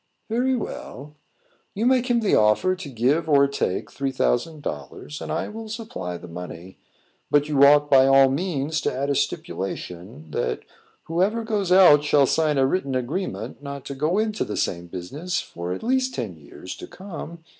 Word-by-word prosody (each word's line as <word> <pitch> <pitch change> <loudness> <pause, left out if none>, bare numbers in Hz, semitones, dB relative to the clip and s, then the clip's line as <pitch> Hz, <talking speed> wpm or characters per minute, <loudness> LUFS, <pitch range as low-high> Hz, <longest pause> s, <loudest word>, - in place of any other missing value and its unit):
"Very 250 +4 +1
well. 150 - -6 0.6
You 215 +4 -1
make 255 -1 +3
him 240 -1 +3
the 210 - +1
offer 110 +13 +4
to 180 -6 -8
give 140 +7 +1
or 140 -1 +5
take 135 -9 -2
three 135 -1 -2
thousand 145 +4 0
dollars, 75 - -6
and 80 -1 -5
I - - -1
will 220 +1 -8
supply 215 - -5
the 90 - -11
money. 90 +1 -9 0.5
But 145 0 +3
you 140 -2 +3
ought, 145 +1 +7
by 135 -1 +7
all 135 0 +6
means, 150 -1 -1
to - - 0
add 140 +2 -1
a - - +1
stipulation, 95 - -4
that - - -2 0.4
whoever 195 +8 0
goes 210 -5 -1
out 180 -6 +7
shall 145 -1 +4
sign 150 +1 +1
a 135 - +4
written 135 -2 -1
agreement 130 - -3
not 140 -1 -7
to 140 - -5
go 155 +7 0
into 215 0 0
the 105 - -5
same 85 0 -2
business 140 - -4
for 85 +1 -6
at 90 - -4
least 260 +2 +1
ten 110 -7 -3
years 80 +4 -10
to - - -9
come. 170 -3 -9
145 Hz, 180 wpm, -24 LUFS, 120-185 Hz, 0.6 s, ought